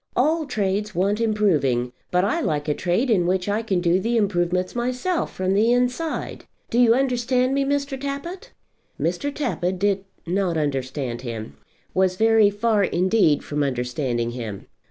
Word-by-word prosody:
All 310 +4 +2
trades 210 -3 -1
want 200 +5 +1
improving; 155 - +1 0.2
but 180 +1 +2
I 280 +12 0
like 150 - -1
a 150 - +2
trade 185 - 0
in 180 -5 +3
which 185 +1 0
I 205 +2 0
can 195 -6 -1
do 175 +1 +3
the 230 +4 0
improvements 180 -3 0
myself, 250 +9 -1
from 185 0 -1
the 215 +4 +3
inside. 250 +6 -1 0.3
Do 235 - +2
you 235 -2 +6
understand 255 0 +1
me, 275 0 +2
Mr. 280 -1 -1
Tappitt?" 280 +7 -5 0.5
Mr. 285 - -1
Tappitt 190 - -2
did 200 0 0 0.2
not 180 -1 0
understand 135 -4 -2
him, 115 - -6 0.4
was 185 -1 +2
very 220 0 +5
far 210 0 +1
indeed 185 -4 +2
from 150 0 -2
understanding 125 -2 -1
him. 115 -5 -6
200 Hz, 155 wpm, -23 LUFS, 165-245 Hz, 0.5 s, you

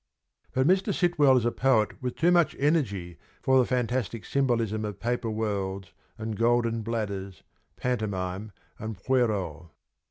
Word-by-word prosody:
But 130 0 +3
Mr. 190 +5 +3
Sitwell 150 -7 +4
is 120 - +1
a 120 - +2
poet 125 -2 +1
with 125 -1 -3
too 170 +2 +3
much 175 -2 +3
energy 100 - 0 0.2
for 130 0 +4
the 125 - +3
fantastic 120 -3 -1
symbolism 115 -6 0
of 105 -2 -5
paper 120 0 -1
worlds 100 -4 -3 0.2
and 110 0 -4
golden 115 0 +2
bladders, 100 -4 -4 0.3
pantomime 105 -4 -2 0.3
and 110 -2 -5
pierrot. 100 - 0
115 Hz, 135 wpm, -27 LUFS, 100-130 Hz, 0.3 s, Sitwell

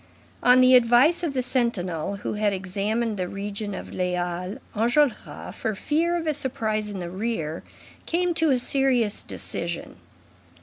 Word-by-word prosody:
On 250 +1 +6
the 255 0 +6
advice 250 +7 +5
of 320 -6 -2
the 255 - 0
sentinel 200 - -1
who 200 - -4
had 210 -1 +1
examined 205 +4 -2
the 180 -1 -2
region 200 +1 -5
of - - -8
the 180 0 -1
Halles, 180 +4 -3 0.2
Enjolras, 240 +4 0
for 220 -2 -3
fear 330 - 0
of 330 - -4
a 310 - +1
surprise 215 -6 -1
in 205 - -6
the 175 -2 -5
rear, 185 -6 -3 0.5
came 350 +1 +1
to 325 -1 +2
a 265 - +4
serious 245 -4 +2
decision. 170 0 -4
220 Hz, 160 wpm, -25 LUFS, 195-260 Hz, 0.5 s, On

